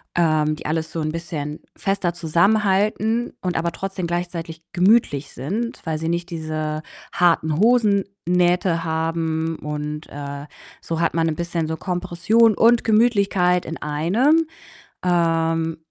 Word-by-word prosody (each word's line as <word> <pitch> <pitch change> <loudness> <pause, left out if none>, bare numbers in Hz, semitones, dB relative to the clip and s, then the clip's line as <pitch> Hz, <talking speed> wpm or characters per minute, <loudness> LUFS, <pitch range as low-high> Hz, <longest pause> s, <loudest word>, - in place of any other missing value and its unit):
ähm, 155 -2 +2
die - - -12
alles 160 +1 -2
so 165 - -4
'n 155 0 -1
bisschen 155 -3 -5 0.2
fester 195 -3 -1
zusammenhalten 205 +6 +1
und 180 -2 -2
aber 170 +1 0
trotzdem 195 -2 -4
gleichzeitig 170 -2 -4
gemütlich 180 - +3
sind, 220 - -4
weil 160 -1 -1
sie 160 +1 -2
nicht 170 +1 -2
diese 155 -1 -3 0.3
harten 165 -3 +2
Hosennähte 195 -6 +2
haben 160 0 -1
und, 150 +1 -5
äh, 140 0 -6 0.4
so 165 0 -3
hat 170 - +1
man 165 -1 +1
bisschen 170 -1 -2
so 160 0 -3
Kompression 185 +5 +2
und 235 +1 +4
Gemütlichkeit 200 -6 +3
in 165 - -5
einem. 215 - +2 0.6
Ähm, 165 -2 +1
170 Hz, 130 wpm, -22 LUFS, 160-195 Hz, 0.6 s, und